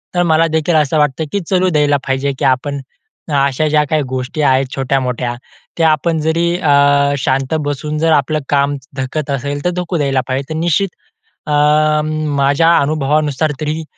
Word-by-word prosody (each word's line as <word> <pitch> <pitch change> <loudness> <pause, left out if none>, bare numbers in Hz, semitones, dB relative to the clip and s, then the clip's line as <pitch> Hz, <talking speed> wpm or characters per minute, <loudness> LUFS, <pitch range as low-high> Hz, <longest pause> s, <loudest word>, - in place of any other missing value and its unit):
तर 175 - +3
मला 160 +1 +3
देखील 160 +1 0
असं 155 0 +2
वाटतं 150 +1 +1
की 200 - 0
चलू 185 -1 +2
द्यायला 145 -3 +2
पाहिजे, 135 +1 0
की 145 - 0
आपण 135 +2 0 0.6
अशा 140 +2 +1
ज्या 150 0 +3
काही 155 -1 +1
गोष्टी 130 +5 -3
आहेत 135 -2 +3
छोट्यामोठ्या, 125 -2 -1 0.4
त्या 165 -1 +4
आपण 160 +2 0
जरी 160 +2 +1
अ, 140 -3 +3
शांत 135 +2 -1
बसून 150 +2 -3
जर 165 +1 +2
आपलं 155 +1 +1
काम 140 0 +1 0.2
धकत 135 +3 -3
असेल 140 +1 -3
तर - - +3
धकू 180 0 -3
द्यायला 135 -3 +1
पाहिजे. 135 +1 -2
तर 155 - -3
निश्चित 175 +4 +1 0.6
अं, 150 +1 +3 0.3
माझ्या 140 +4 +3
अनुभवानुसार 150 0 0
तरी, 155 +1 -2
150 Hz, 165 wpm, -16 LUFS, 140-155 Hz, 0.6 s, त्या